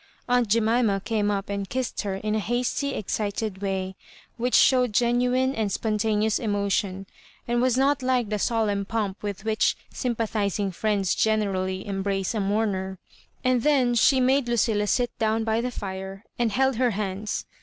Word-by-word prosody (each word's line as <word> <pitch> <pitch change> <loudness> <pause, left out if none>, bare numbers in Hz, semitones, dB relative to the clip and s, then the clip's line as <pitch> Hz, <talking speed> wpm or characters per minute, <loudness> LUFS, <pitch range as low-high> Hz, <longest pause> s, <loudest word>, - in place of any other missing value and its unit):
Aunt 245 -1 +2
Jemima 225 -1 +2
came 210 0 -1
up 200 -1 -1
and 200 -1 -4
kissed 255 -1 -2
her 200 -3 -3
in 210 +2 -2
a 215 - +1
hasty 245 +5 -1
excited 205 -1 -3
way, 190 -1 -2 0.4
which 245 +1 0
showed 250 -4 +4
genu 245 +2 +2
ine 260 +1 +2
and 215 -4 -1
spontaneous 215 0 0
emotion, 200 -3 -1 0.4
and 240 0 +1
was 255 -1 +2
not 275 +1 +2
like 255 -4 +1
the 210 -1 -1
solemn 210 -3 0
pomp 205 -1 -3
with 205 -1 -5
which 220 -1 +1 0.2
sympathising 215 -5 -1
friends 200 0 0
generally 190 -4 0
embrace 195 0 -2
a 220 - -1
mourner; 195 -2 -1 0.5
and 255 -1 +2
then 260 -3 +3
she 260 +3 +4
made 260 +1 +2
Lucilla 220 -3 +1
sit 245 +3 +1
down 220 0 +1
by 220 +1 +1
the 250 - -2
fire 190 -2 -6 0.2
and 235 -2 +2
held 265 +2 +1
her 250 0 +3
hands. 205 0 -3
215 Hz, 165 wpm, -25 LUFS, 200-240 Hz, 0.5 s, showed